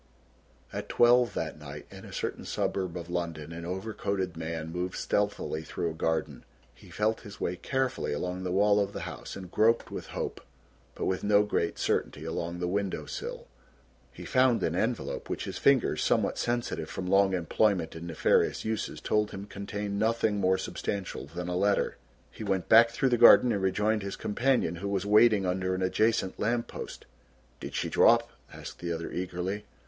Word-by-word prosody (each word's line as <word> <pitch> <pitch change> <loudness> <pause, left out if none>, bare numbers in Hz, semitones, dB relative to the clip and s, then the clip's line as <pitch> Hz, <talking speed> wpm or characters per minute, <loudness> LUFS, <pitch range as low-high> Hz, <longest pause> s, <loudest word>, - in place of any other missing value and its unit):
At - - -5
twelve 120 0 +4
that 80 -2 -3
night 75 0 -9
in - - -11
a - - -10
certain - - -4
suburb 90 -3 -2
of 85 -1 -7
London 85 -3 -4
an 85 0 -7
overcoated 95 -1 -3
man 80 0 -4
moved 90 +1 -3
stealthily 80 - -1
through 85 +1 -3
a - - -7
garden. 80 0 -2 0.3
He - - -17
felt 110 +1 0
his 100 -1 -11
way 90 - -1
carefully 130 +7 -1
along 90 +5 -3
the 90 -1 -3
wall 100 +2 +4
of 100 0 -1
the - - -5
house - - -7
and 95 -2 -9
groped 115 +2 +2
with - - -6
hope, - - -4 0.5
but - - -3
with 95 - -1
no 105 0 +5
great 100 -5 -1
certainty, - - -1
along 85 +1 -3
the 90 0 -2
window 100 +1 -2
sill. 485 +1 -6 0.7
He - - -10
found 130 -2 +3
an 80 - 0
envelope 115 +5 -2
which - - -3
his - - -5
fingers, 140 -3 +3
somewhat - - +1
sensitive 120 0 -2
from 95 - -5
long 95 0 +4
employment 90 0 +1
in 85 +1 -7
nefarious 80 - +2
uses, 110 0 -3
told 105 0 +1
him 100 +1 -7
contained 100 0 -4
nothing 110 -1 +1
more 95 -1 +3
substantial 95 -4 -4
than 90 +4 -6
a 90 - -2
letter. 100 +2 +1 0.3
He - - -8
went 95 -2 -1
back 115 +1 +8
through 125 +3 +1
the 120 -2 +2
garden 120 +1 +8
and 100 -3 0
rejoined 105 +3 +1
his 100 0 -4
companion, 115 -6 0
who 100 +3 -4
was 100 -1 -1
waiting 105 -1 +5
under 95 0 0
an 95 - -2
adjacent 100 0 +1
lamp 115 +2 0
post. - - -8 0.5
"Did - - -7
she - - -1
drop?" - - +4 0.2
asked - - -9
the 85 -1 -3
other 85 0 -4
eagerly. 90 +3 -3
95 Hz, 185 wpm, -29 LUFS, 90-110 Hz, 0.7 s, back